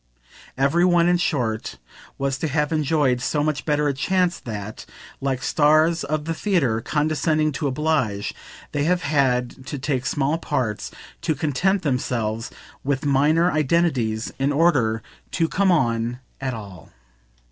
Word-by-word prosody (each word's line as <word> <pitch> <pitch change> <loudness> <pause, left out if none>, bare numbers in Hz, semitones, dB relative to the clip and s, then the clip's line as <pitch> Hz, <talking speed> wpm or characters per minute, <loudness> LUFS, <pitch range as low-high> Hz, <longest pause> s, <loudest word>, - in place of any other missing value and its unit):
Every 140 +6 +3
one, 175 -1 +4
in 175 0 +4
short, 125 -11 -1 0.4
was 135 -1 -1
to 160 - -1
have 150 +1 0
enjoyed 150 -5 +1
so 145 +3 0
much 155 -1 -1
better 150 -1 +1
a 140 - +1
chance 180 +6 +1
that, 105 -2 -7 0.3
like 135 -2 -1
stars 155 +2 +3
of 150 +1 -2
the 165 - -1
theatre 155 - +1
condescending 155 +2 +1
to 145 +1 -2
oblige, 130 -8 0 0.4
they 145 0 0
have 180 +1 +1
had 130 -3 0
to 145 - -4
take 135 -1 -2
small 145 +3 0
parts, 115 -9 -2 0.3
to 155 - 0
content 170 +7 0
themselves 120 -5 -1 0.3
with 140 +1 -1
minor 150 +5 +3
identities, 135 -8 +1
in 135 +2 +1
order 135 -9 +2 0.3
to 165 -2 +2
come 190 +3 +2
on 120 -6 +1 0.2
at 130 -2 -2
all. 100 -7 -10
145 Hz, 145 wpm, -23 LUFS, 125-160 Hz, 0.4 s, one